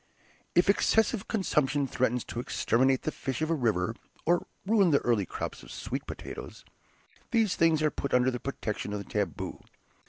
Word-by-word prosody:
If 175 - +5
excessive 220 +1 +3
consumption 145 - +1
threatens 125 -2 0
to 120 - -6
exterminate 130 +2 +2
the 155 - -1
fish 135 +1 -3
of 160 - 0
a - - +4
river, 115 - +1 0.3
or 175 +1 +2 0.2
ruin 200 -3 +4
the 145 - +5
early 110 -6 +1
crop - - -5
of - - -13
sweet - - -5
potatoes, - - -8 0.6
these 220 -6 +2
things 160 -2 +3
are 155 - +3
put 140 - -4
under 125 +1 +4
the 125 - -4
protection 105 -6 -4
of 105 - -2
the 100 - -7
taboo. 100 -8 -3
135 Hz, 175 wpm, -29 LUFS, 120-170 Hz, 0.6 s, If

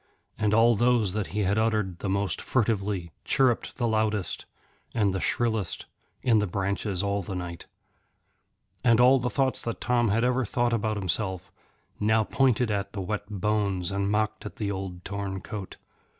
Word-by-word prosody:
And 105 -1 +1
all 115 +2 +5
those 120 -4 +2
that 105 -2 -2
he 105 - -2
had 100 +2 +2
uttered 105 -5 0
the 100 - -3
most 100 0 0
furtively, 100 -7 0
chirrupped 130 -4 +2
the 120 - +1
loudest 110 -3 -1 0.5
and 105 -4 +2
the 95 - -1
shrillest 110 -4 0 0.4
in 115 -4 +4
the 105 - 0
branches 100 +1 -1
all 100 0 0
the 95 +1 -5
night. 90 -1 -6 1.2
And 115 -1 +5
all 130 +2 +6
the 125 0 -1
thoughts 135 -1 0
that 115 - -4
Tom 120 -1 +2
had 115 +4 +2
ever 125 +1 +2
thought 120 +2 0
about 110 -1 0
himself 95 -1 -2 0.5
now 110 +1 +3
pointed 125 -1 +2
at 100 -1 -2
the 100 - -3
wet 105 +2 -4
bones 100 -3 0
and 100 0 0
mocked 110 0 0
at 105 - -7
the 100 -2 -2
old 95 -2 -6
torn 100 -1 -3
coat. 100 0 -7
105 Hz, 170 wpm, -27 LUFS, 100-115 Hz, 1.2 s, all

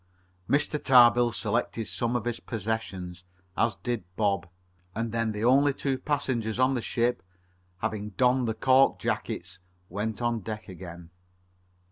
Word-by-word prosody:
Mr. 150 +1 +1
Tarbill 120 -2 +6
selected 115 +1 -1
some 115 +7 -1
of 120 -2 -1
his 120 -1 -2
possessions, 95 -5 -4 0.3
as 115 -3 +1
did 110 +3 -3
Bob, 100 -4 0 0.5
and 115 +1 -2
then 115 -1 0
the 105 +1 -4
only 135 +3 +4
two 135 -2 -1
passengers 125 -7 -1
on 130 +1 +3
the 125 - -1
ship, 120 +2 0 0.6
having 105 -1 -2
donned 125 -1 +3
the 110 - -1
cork 130 +4 +4
jackets, 90 -1 -3 0.3
went 105 +3 -3
on 120 -1 0
deck 110 +1 -6
again. 85 -2 -10
115 Hz, 140 wpm, -28 LUFS, 105-125 Hz, 0.6 s, Tarbill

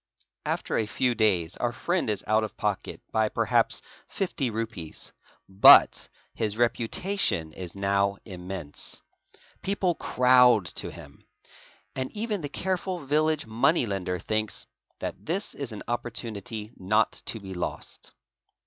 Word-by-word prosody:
After - - -1
a 110 - 0
few 125 +3 +1
days 100 -6 +1
our 120 - 0
friend 170 +4 -1
is 105 -2 -1
out 110 +1 +3
of 110 - -6
pocket 105 -2 -3
by 110 -1 +2
perhaps - - +2 0.2
fifty 160 -9 -1
rupees; 110 -8 -5 0.3
but 95 +1 +7 0.2
his 110 -1 -2
reputation 120 - 0
is 90 +1 -8
now 100 0 +1
immense. 90 -5 -6 0.6
People 190 -2 +1
crowd 125 - +5
to - - -4
him; - - -13 0.7
and 130 0 -3
even 215 -2 -1
the 145 - -4
careful 185 0 -2
village 155 +2 +1
money 120 +7 +2
lender 95 -3 -2
thinks 110 +3 -2 0.2
| - - -42
that - - -5
this 190 +6 -2
is 140 -4 -5
an 105 - -7
opportunity 115 -2 -4
not 105 +4 +1
to 110 - -2
be 95 -2 -8
lost. 90 - -6
110 Hz, 135 wpm, -27 LUFS, 100-135 Hz, 0.7 s, but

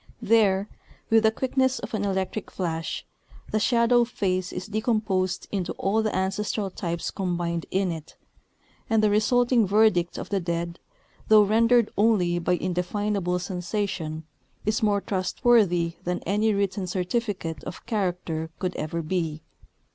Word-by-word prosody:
There, 205 -3 +3 0.4
with 225 0 +6
the 220 0 +4
quickness 260 +2 +1
of - - -7
an 210 -2 -1
electric 190 +1 -2
flash, 165 -3 -3 0.5
the 215 - +1
shadow 235 +1 +4
face 185 -6 -1
is 180 - -5
decomposed 210 -4 -1
into 185 -3 -2
all 205 +3 0
the 215 -1 -1
ancestral 195 +1 -1
types 170 -1 -3
combined 175 -3 -2
in 190 -1 0
it; 160 -2 -8 0.7
and 220 -2 +3
the 210 - +4
resulting 235 +1 +3
verdict 200 -4 +3
of - - -6
the 200 - +1
dead, 170 0 -3 0.5
though 215 -1 +7
rendered 230 +2 +3
only 185 -6 +3
by 175 +1 +1
indefinable 180 +1 -1
sensation, 180 -3 -3 0.4
is 215 +1 +1
more 205 -2 +2
trustworthy 185 -4 +2
than 180 0 -2
any 210 +4 +2
written 200 -2 -1
certificate 180 -4 -2
of - - -8
character 180 -7 -2
could 185 -1 -3
ever 165 +2 -3
be. 160 -2 -2
195 Hz, 140 wpm, -25 LUFS, 175-215 Hz, 0.7 s, though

